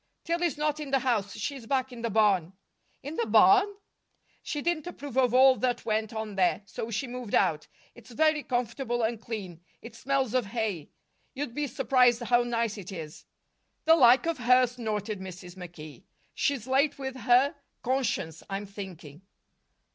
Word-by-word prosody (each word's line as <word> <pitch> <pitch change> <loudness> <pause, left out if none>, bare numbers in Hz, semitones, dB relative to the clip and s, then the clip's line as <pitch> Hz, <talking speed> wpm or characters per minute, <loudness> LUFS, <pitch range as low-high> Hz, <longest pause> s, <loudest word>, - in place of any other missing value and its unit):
"Tillie's 340 -3 -1
not 300 0 -1
in 295 -2 -5
the 270 - +3
house. 225 -6 -1
She's 250 +1 -5
back 265 0 0
in 240 -2 -9
the 230 - -1
barn." 195 -5 +2 0.5
"In 290 +4 -6
the 235 - 0
barn!" 215 - +6 0.7
"She 295 - -4
didn't 335 +1 -1
approve 290 -7 -8
of 255 -3 +3
all 260 +1 +6
that 245 -1 -1
went 220 -1 -1
on 220 -2 -5
there, 190 +1 +1
so 220 +3 -6
she 225 +4 -2
moved 245 -3 -4
out. 155 -2 +1 0.3
It's 240 - -16
very 310 +5 +2
comfortable 240 -1 -2
and 225 0 -1
clean; 195 -8 -6 0.2
it 230 - -12
smells 270 -3 -1
of 250 -5 +1
hay. 210 -8 -3 0.5
You'd 275 -3 -4
be 295 +2 -2
surprised 250 -1 +3
how 240 +1 +3
nice 230 -3 -1
it 190 0 -9
is." 160 -5 -8 0.6
"The 320 +1 +7
like 255 -2 +6
of 330 -4 -1
her!" 250 +1 +5
snorted 220 -4 -4
Mrs. 180 -1 -9
McKee. 175 -1 -11 0.3
"She's 275 -6 -1
late 275 +3 +2
with 265 -1 -5
her 255 +4 +3 0.3
conscience, 220 - -1
I'm 195 +1 -4
thinking." 185 -6 -10
240 Hz, 170 wpm, -28 LUFS, 205-265 Hz, 0.7 s, The